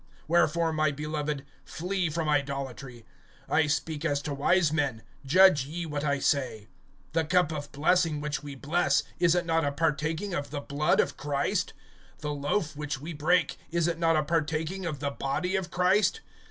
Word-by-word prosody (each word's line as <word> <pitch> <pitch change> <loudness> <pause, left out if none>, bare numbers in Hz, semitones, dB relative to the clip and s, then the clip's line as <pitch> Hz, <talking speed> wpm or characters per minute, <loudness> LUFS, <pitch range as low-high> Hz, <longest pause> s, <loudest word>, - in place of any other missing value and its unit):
(14)Wherefore, 170 0 +2
my 155 -1 +2
beloved, 150 -1 -3 0.2
flee 180 0 -2
from 160 0 -2
idolatry. 135 -4 -2 0.4
(15)I 155 -1 +2
speak 150 0 -1
as 145 -1 +1
to 150 - -3
wise 155 +3 +2
men; 140 -8 -1 0.2
judge 170 -3 +6
ye 170 +3 -4
what 150 -2 -3
I 145 -1 +1
say. 125 -7 -1 0.4
(16)The 160 -1 0
cup 180 -3 +3
of 145 -2 -5
blessing 160 +1 +2
which 150 0 -3
we 145 -2 -8
bless, 150 +6 +1 0.2
is 175 -1 +4
it 175 0 +1
not 165 0 +1
a 145 - +1
partaking 160 +5 -1
of 145 -4 -3
the 145 - -4
blood 150 +3 +1
of - - +1
Christ? 140 -1 -1 0.4
The 150 -1 -4
loaf 150 +3 -1
which 145 -2 -4
we 160 +4 -6
break, 160 +3 +1
is 170 0 +1
it 165 -1 -2
not 165 -1 +3
a 155 - +2
partaking 160 +4 -1
of 150 -4 -4
the 140 -1 -1
body 140 +8 -2
of 190 -2 -2
Christ? 190 - +2
155 Hz, 180 wpm, -28 LUFS, 145-170 Hz, 0.4 s, judge